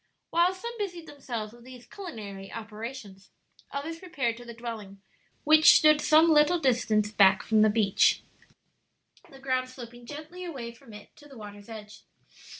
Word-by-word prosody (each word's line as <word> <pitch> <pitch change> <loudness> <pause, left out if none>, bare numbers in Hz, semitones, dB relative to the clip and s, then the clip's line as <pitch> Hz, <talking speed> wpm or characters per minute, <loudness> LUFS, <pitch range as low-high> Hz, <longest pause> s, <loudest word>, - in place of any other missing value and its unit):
While 345 +3 +3
some 470 +5 -7
busied 350 -5 -5
themselves 235 -8 -6
with 240 0 -16
these 250 -1 -13
culinary 205 - -9
operations, 215 -2 -9 0.4
others 320 +4 -5
repaired 270 -11 -2
to 245 - -12
the 235 -1 -10
dwelling, 220 -4 -8 0.4
which 310 +1 +7
stood 305 -1 +5
some 320 +2 +5
little 305 +3 +4
distance 230 -7 +1
back 190 -2 +4
from 220 -1 +2
the 215 - +5
beach, 205 -2 +2 1.1
the 270 - -14
ground 260 -1 -2
sloping 240 -2 -12
gently 310 +6 -9
away 265 -9 -6
from 235 0 -17
it 210 0 -14
to 295 - -16
the 270 - -13
water's 205 0 -11
edge. 210 -2 -10
245 Hz, 155 wpm, -27 LUFS, 215-305 Hz, 1.1 s, which